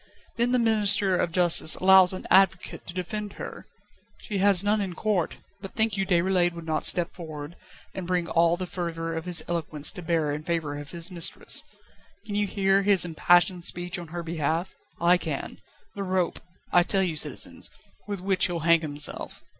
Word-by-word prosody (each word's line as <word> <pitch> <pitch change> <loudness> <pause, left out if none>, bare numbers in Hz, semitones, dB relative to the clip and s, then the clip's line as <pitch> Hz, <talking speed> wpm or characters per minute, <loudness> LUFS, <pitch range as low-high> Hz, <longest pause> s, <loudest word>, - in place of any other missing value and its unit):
Then 240 +1 +1
the 250 - +3
Minister 205 -4 +3
of 175 - -1
Justice 175 -2 +2
allows 190 -1 +6
an 185 - -7
advocate 190 -1 +2
to 175 - -6
defend 205 +3 -5
her. - - -9 0.6
She 205 -4 -3
has 195 -1 +4
none 210 +1 +1
in 185 -3 -4
court; 200 -5 -1 0.2
but 195 - -9
think 220 -2 +1
you 195 -1 -2
Déroulède 180 -1 +2
would 170 -1 -9
not 155 -1 +4
step 175 -1 +2
forward, 155 -2 -8 0.4
and 185 -2 -6
bring 180 -2 -1
all 170 0 +2
the 185 - -4
fervour 165 -2 -4
of 160 0 -5
his 180 -2 +1
eloquence 155 -3 -2
to 185 - -9
bear 165 -3 0
in 150 - -4
favour 155 -3 -3
of 145 0 -8
his 170 +1 -2
mistress? 170 -2 +1 0.6
Can 205 - -7
you 205 0 0
hear 195 0 +2
his 200 -2 +3
impassioned 175 +2 +3
speech 175 +1 -1
on 170 - -9
her 170 +2 -6
behalf? 165 +2 -2 0.3
I 175 +1 +4
can 155 -5 -5 0.3
the 200 - -6
rope, 185 -2 -1 0.3
I 175 - +5
tell 190 +2 +3
you, 170 -4 -2
citizens, 150 - -1 0.4
with 200 -3 -5
which 190 -1 +1
he'll 175 -2 -4
hang 165 +1 +4
himself. 150 -1 -3
175 Hz, 185 wpm, -26 LUFS, 165-195 Hz, 0.6 s, allows